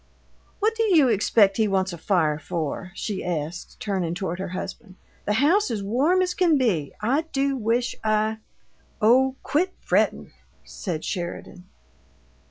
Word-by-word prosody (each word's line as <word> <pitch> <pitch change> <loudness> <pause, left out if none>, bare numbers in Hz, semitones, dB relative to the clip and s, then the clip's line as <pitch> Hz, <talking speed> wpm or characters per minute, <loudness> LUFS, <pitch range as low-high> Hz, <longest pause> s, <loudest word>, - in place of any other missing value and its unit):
"What 435 +2 +1
do 450 - -2
you 340 - +4
expect 205 -2 +3
he 220 -1 +3
wants 190 -2 0
a - - -6
fire 160 -5 +1
for?" 170 +2 -4
she 205 -2 -4
asked, 170 0 -4
turning 185 -5 -2
toward 180 -2 -3
her 190 - -3
husband. 185 +2 -7 0.3
"The 210 - +1
house 335 - +3
is 210 -3 -3
warm 285 - +2
as 360 -1 -1
can 345 -5 +3
be, 190 - 0
I 255 +8 +2
do 275 0 0
wish 240 0 0
I 215 0 +1 0.3
" - - -41 0.3
"Oh, 260 +4 +4
quit 365 +5 0
frettin'!" - - 0 0.3
said 165 -6 -5
Sheridan. 180 0 -5
215 Hz, 155 wpm, -24 LUFS, 180-270 Hz, 0.3 s, you